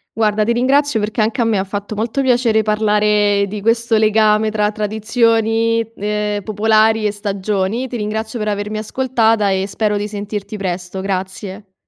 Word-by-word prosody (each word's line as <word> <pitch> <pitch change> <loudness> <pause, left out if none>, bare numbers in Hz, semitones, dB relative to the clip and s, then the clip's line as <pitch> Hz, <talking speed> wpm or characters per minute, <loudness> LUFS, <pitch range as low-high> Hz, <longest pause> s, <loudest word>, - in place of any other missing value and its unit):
Guarda, 215 -1 +1
ti 235 +3 +1
ringrazio 265 +1 +2
perché 215 +2 -1
anche 225 +4 0
a - - +4
me 215 -4 +1
fatto 205 +2 -5
molto 230 +6 -1
piacere 240 -4 +2
parlare 210 -1 +2
di 205 +1 -6
questo 230 0 +2
legame 215 0 +3
tra 210 -1 0
tradizioni, 225 +1 +1 0.2
ehm, 210 0 -2
popolari 215 +1 +2
e - - 0
stagioni. 205 +3 -2
Ti 245 - -5
ringrazio 220 +2 -3
per 210 -1 -2
avermi 205 +1 -3
ascoltata 225 -2 +1
e 190 0 0
spero 210 +1 -1
di 205 +1 -3
sentirti 205 0 -5
presto. 185 -1 -4
Grazie. 190 +1 -5
215 Hz, 155 wpm, -17 LUFS, 205-225 Hz, 0.2 s, a